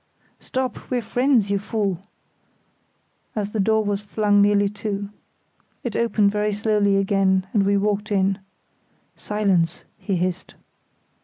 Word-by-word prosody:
"Stop, 260 -2 -4
we're 245 -2 -1
friends, 245 -3 +2
you 200 - +1
fool!" 200 -4 -2 1.4
as 210 -1 -2
the 220 - -3
door 220 +2 +2
was 205 0 -1
flung 205 0 +2
nearly 205 0 +4
to. 205 -1 -4 0.7
It 240 -4 -4
opened 220 -3 +2
very 210 0 0
slowly 205 -1 +2
again, 195 -1 +2
and 200 -3 +2
we 200 0 +3
walked 210 +1 -1
in. 195 0 +1 0.8
"Silence!" 190 -5 0 0.2
he 195 - -2
hissed. 180 +1 -3
205 Hz, 130 wpm, -23 LUFS, 195-215 Hz, 1.4 s, nearly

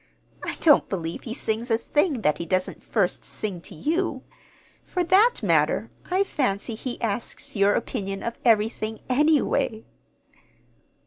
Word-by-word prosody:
I - - -3
don't 300 -4 +5
believe 170 -3 -3
he 225 - -4
sings 225 0 -2
a 225 - +3
thing 295 +2 0
that 150 -6 +1
he 170 - -3
doesn't 185 +1 -1
first 200 -6 0
sing 195 -5 -5
to 190 - -9
you. 310 - -1 0.6
For 360 - -1
that 395 +8 +4
matter, - - +2 0.2
I 370 +2 +3
fancy 240 - -1
he 240 +3 -5
asks 225 +2 -3
your 200 0 +4
opinion 195 -5 -3
of 235 - -4
everything, 220 -1 +1
anyway." 270 -5 +2
225 Hz, 140 wpm, -25 LUFS, 200-295 Hz, 0.6 s, don't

